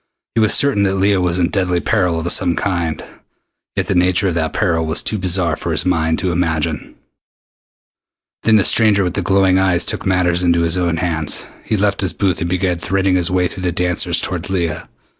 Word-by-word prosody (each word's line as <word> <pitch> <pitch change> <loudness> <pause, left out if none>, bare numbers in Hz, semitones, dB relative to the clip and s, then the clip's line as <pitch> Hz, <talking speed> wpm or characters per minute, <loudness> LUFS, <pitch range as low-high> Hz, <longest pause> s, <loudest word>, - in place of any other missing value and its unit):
He 115 - +1
was 110 - +4
certain 140 -7 +3
that 95 -1 +1
Leah 95 0 +1
was 90 -1 0
in 90 -1 +1
deadly 90 -3 0
peril 90 -5 0
of 85 +1 0
some 85 - +2
kind, 85 -5 -2 0.7
yet - - -1
the - - -1
nature 90 +2 +2
of - - -2
that 80 -1 -1
peril 85 -5 0
was 80 - -1
too 105 - -1
bizarre 90 -3 +1
for - - -5
his - - -1
mind 80 -3 0
to 95 - -2
imagine. 80 -4 -2 1.5
Then 110 - +3
the 105 - +4
stranger 105 -2 +4
with 90 -2 -2
the - - -2
glowing 95 -1 +2
eyes 95 -2 +1
took - - -2
matters 90 -2 +1
into 85 -1 +2
his 85 +1 +1
own 85 -2 -1
hands. 80 -3 -1 0.2
He 110 - -1
left 100 -1 0
his 95 - 0
booth 95 -5 -1
and 85 - -2
began 90 -1 -1
threading 95 +2 0
his 90 0 +2
way 90 -1 +1
through 95 +1 -9
the 90 -1 -1
dancers 90 0 -1
toward 90 0 -5
Leah. 85 -5 -3
90 Hz, 210 wpm, -17 LUFS, 85-95 Hz, 1.5 s, was